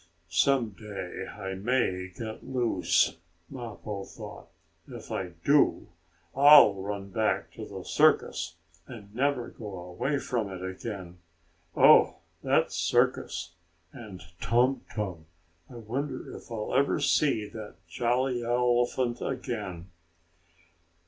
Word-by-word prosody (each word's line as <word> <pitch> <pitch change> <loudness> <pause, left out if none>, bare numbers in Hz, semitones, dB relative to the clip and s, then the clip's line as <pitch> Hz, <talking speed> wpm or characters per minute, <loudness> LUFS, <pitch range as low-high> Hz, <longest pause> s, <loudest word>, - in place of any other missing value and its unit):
"Some 125 +6 +3
day 100 -3 -7
I 95 -2 -6
may 95 -3 0
get 110 +4 -7
loose," 125 -9 +1 0.3
Mappo 110 -5 -6
thought. - - -10 0.4
"If - - -10
I 90 -2 -3
do, 145 0 +3 0.5
I'll 140 -5 +9
run 100 0 -5
back 110 +2 0
to - - -8
the - - -8
circus, - - +2 0.3
and 105 -5 -11
never 130 0 0
go 105 -4 -8
away 115 +12 -2
from 115 -6 -2
it 95 -1 -7
again. 95 -3 -7 0.6
Oh - - +7 0.3
that - - +2
circus! 85 0 0 0.4
And 100 -7 -10 0.2
Tum 125 +2 +2
Tum! 90 -7 -5 0.4
I - - -12
wonder 130 +4 -5
if - - -12
I'll 110 -2 -4
ever 140 +2 +2
see 140 -6 +2
the 105 0 -9
jolly 120 +6 0
elephant 120 0 +1
again." 90 0 -4
110 Hz, 115 wpm, -28 LUFS, 95-125 Hz, 0.6 s, I'll